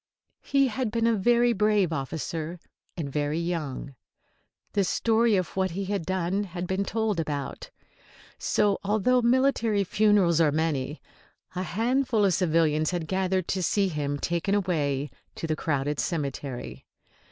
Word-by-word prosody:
He 275 -1 +2
had 250 0 -2
been 230 +1 0
a 230 - +4
very 240 +3 +3
brave 210 -4 +2
officer, 160 +3 -4 0.4
and 140 -5 -4
very 150 +1 0
young. 160 -5 -3 0.8
The 200 - +2
story 225 +3 +2
of 185 -3 -2
what 190 0 +1
he 195 +3 -4
had 195 -4 -3
done 190 +2 0
had 175 -1 -5
been 190 +2 -1
told 220 -3 -1
about. 145 -3 -4 0.7
So, 205 -1 +1
although 220 +5 +2
military 235 -4 +2
funerals 195 -4 +3
are 155 -3 +4
many, 150 -2 -1 0.5
a 180 - -3
handful 230 +3 +1
of 190 - +3
civilians 160 -3 +2
had 175 -3 -2
gathered 185 0 0
to 190 - 0
see 195 +2 +2
him 145 -3 -2
taken 170 +6 0
away 150 -8 0 0.2
to - - -5
the 155 -1 0
crowded 145 -2 -1
cemetery. 140 -5 -4
185 Hz, 145 wpm, -27 LUFS, 155-210 Hz, 0.8 s, a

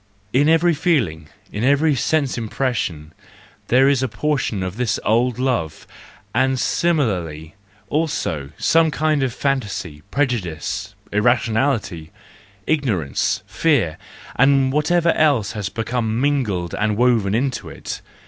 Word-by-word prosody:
In 145 +4 +4
every 165 +1 +4
feeling, 95 - 0 0.2
in 105 - -3
every 145 +4 +3
sense 140 +1 0
impres¬ 125 +3 -2
sion, 80 -8 -4 0.5
there 130 +2 +4
is 140 -2 +3
a 130 - +1
portion 125 -6 -1
of 95 0 -4
this 120 -4 0
old 120 +2 +2
love: 125 -12 -2 0.5
and 130 -1 +1
similarly 90 - -1 0.3
also 85 - -2
some 165 0 +3
kind 155 0 0
of 130 -2 0
fantasy, 105 - -3
prejudice, 110 - -2 0.2
irrationality, 110 - 0 0.5
ignorance, 105 - 0
fear, 140 - +1 0.4
and 135 0 +4
whatever 170 +3 +2
else 140 -11 +2
has 105 -3 -4
become 115 0 -2
mingled 120 -11 0
and 105 0 0
woven 115 -5 +2
into 130 +2 -2
it. - - -7
125 Hz, 120 wpm, -20 LUFS, 100-140 Hz, 0.5 s, In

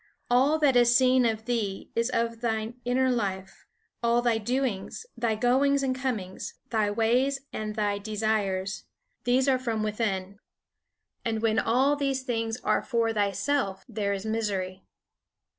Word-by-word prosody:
All 270 +5 +4
that 290 -4 +3
is 240 0 +5
seen 255 -1 +5
of 220 -1 -2
thee 220 -5 -2
is 230 +1 +1
of 230 -2 -1
thy 220 -1 -1
inner 255 +1 +2
life. 195 -5 -3 0.3
All 235 0 +2
thy 235 -2 +2
doings, 245 - -2
thy 235 -2 0
goings 275 +5 +2
and 260 -1 0
comings, 230 -8 -4 0.2
thy 215 -3 +2
ways 245 +6 +1
and 215 -1 -4
thy 205 -2 0
desires, 205 -2 -1 0.4
these 255 +2 +3
are 260 -2 +3
from 230 -4 -2
within. 205 -2 -2 0.8
And 225 -1 -2
when 220 -1 +3
all 265 +5 +3
these 275 -2 -1
things 225 -2 -2
are - - +2
for 230 -2 0
thyself 200 0 0
there 210 -4 -2
is 200 +1 -3
misery. 200 -4 -2
230 Hz, 145 wpm, -27 LUFS, 210-255 Hz, 0.8 s, is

